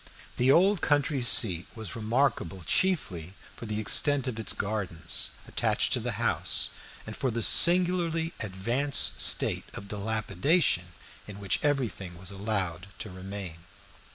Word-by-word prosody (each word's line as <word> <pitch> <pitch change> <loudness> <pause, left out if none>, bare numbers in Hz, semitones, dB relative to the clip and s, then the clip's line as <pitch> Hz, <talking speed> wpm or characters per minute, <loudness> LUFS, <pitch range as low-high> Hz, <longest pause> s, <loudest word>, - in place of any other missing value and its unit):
The 125 +2 +3
old 190 +4 +3
country 145 -2 0
seat 105 -8 +4
was 110 -6 -7
remarkable 110 - -1
chiefly 95 - -1 0.2
for 115 - -9
the 105 0 -4
extent 140 +5 +2
of 130 - -2
the 110 -1 -1
gardens 95 -6 -3 0.2
attached - - 0
to - - +1
the - - -4
house, - - +1 0.3
and 110 - -8
for 130 - -2
the 115 -1 -1
singularly 170 - +5
advanced 115 +8 -1
state - - +1
of 100 - -7
dilapidation 110 - 0 0.4
in 100 -1 -10
which 100 -2 -1
everything 110 - -2
was 95 +3 -5
allowed 95 -3 -4
to 110 - -8
remain. 95 -2 -8
110 Hz, 135 wpm, -27 LUFS, 95-140 Hz, 0.4 s, singularly